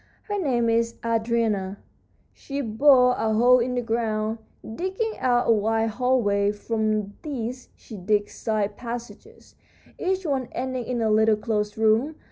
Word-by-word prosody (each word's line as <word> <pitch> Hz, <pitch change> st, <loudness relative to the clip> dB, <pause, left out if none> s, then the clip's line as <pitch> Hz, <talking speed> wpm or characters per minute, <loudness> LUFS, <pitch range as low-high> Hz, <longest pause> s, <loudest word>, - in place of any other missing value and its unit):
Her 410 Hz, -1 st, -3 dB
name 245 Hz, -7 st, +1 dB
is 230 Hz, 0 st, +1 dB
Andrena. 225 Hz, -4 st, 0 dB, 0.6 s
She 280 Hz, 0 st, -6 dB
bores 250 Hz, +1 st, +4 dB
a 220 Hz, 0 st, +1 dB
hole 250 Hz, +3 st, +5 dB
in 250 Hz, +1 st, -1 dB
the 245 Hz, -, -1 dB
ground, 225 Hz, -1 st, -1 dB, 0.4 s
digging 380 Hz, -, -2 dB
out 245 Hz, -1 st, +2 dB
a -, -, +5 dB
wide 225 Hz, +1 st, +1 dB
hallway. 210 Hz, -5 st, +1 dB
From 215 Hz, -1 st, -2 dB
this 255 Hz, -4 st, -5 dB
she 220 Hz, -, -11 dB
digs 205 Hz, +2 st, 0 dB
side 210 Hz, -2 st, -2 dB
passages, 240 Hz, 0 st, -9 dB, 0.5 s
each 375 Hz, 0 st, -1 dB
one 270 Hz, -5 st, -1 dB
ending 255 Hz, -1 st, -3 dB
in 240 Hz, -1 st, -2 dB
a 220 Hz, -, +2 dB
little 220 Hz, 0 st, +4 dB
closed 210 Hz, -1 st, -2 dB
room. 225 Hz, +8 st, +2 dB
230 Hz, 145 wpm, -24 LUFS, 215-255 Hz, 0.6 s, hole